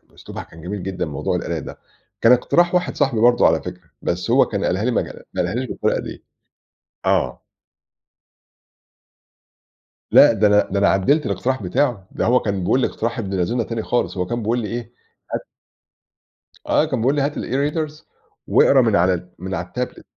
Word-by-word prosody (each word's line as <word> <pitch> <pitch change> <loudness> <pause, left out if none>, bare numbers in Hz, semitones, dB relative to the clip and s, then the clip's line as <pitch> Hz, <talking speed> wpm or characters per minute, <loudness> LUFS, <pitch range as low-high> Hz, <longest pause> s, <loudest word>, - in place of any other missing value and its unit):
أسلوبها - - -8
كان 80 - -15
جميل 95 +3 -5
جدًا 95 0 -3
موضوع 75 -3 -2
القراية - - -3
ده، - - -9 0.4
كان 115 - +6
اقتراح 175 +8 +3
واحد 180 0 0
صاحبي 135 -6 +1
برضه 120 0 +5
على - - +2
فكرة، 90 -2 -9
بس 90 0 -2
هو - - +5
كان - - -3
قالها 95 +4 0
لي 125 - +1
مجال - - -3
قالها 90 +3 0
لي 130 +2 -1
بالطريقة - - -1
ديَّة، - - -8 0.9
آه. 60 - 0 2.7
لأ، - - +7
ده 110 -1 +2
أنا 105 0 +3
ده 100 - 0
أنا 100 - +4
عدَّلت 140 +11 +2
الاقتراح 105 +5 -1
بتاعُه، 100 +1 0
ده - - -2
هو 125 +2 +4
كان 100 -2 -2
بيقول 130 - +2
لي - - +2
اقتراح 115 +1 -3
ابن 100 -3 -3
لذينا 115 +7 0
تاني 115 -1 -4
خالص، 120 - -1
هو 90 -1 -1
كان 120 +1 -3
بيقول 115 +3 0
لي 110 -3 -3
إيه 120 0 -6 0.4
هات - - -1 1.3
آه، - - +3
كان - - -2
بيقول 130 +5 +2
لي: 145 - +1
"هات 145 +1 0
الEreaders 150 +3 -2 0.4
واقرا 135 - +5
من 110 -3 +2
على 90 -1 +1
من 95 +1 -5
على 85 +1 -5
الTablet" 125 0 -4
110 Hz, 180 wpm, -21 LUFS, 95-125 Hz, 2.7 s, لأ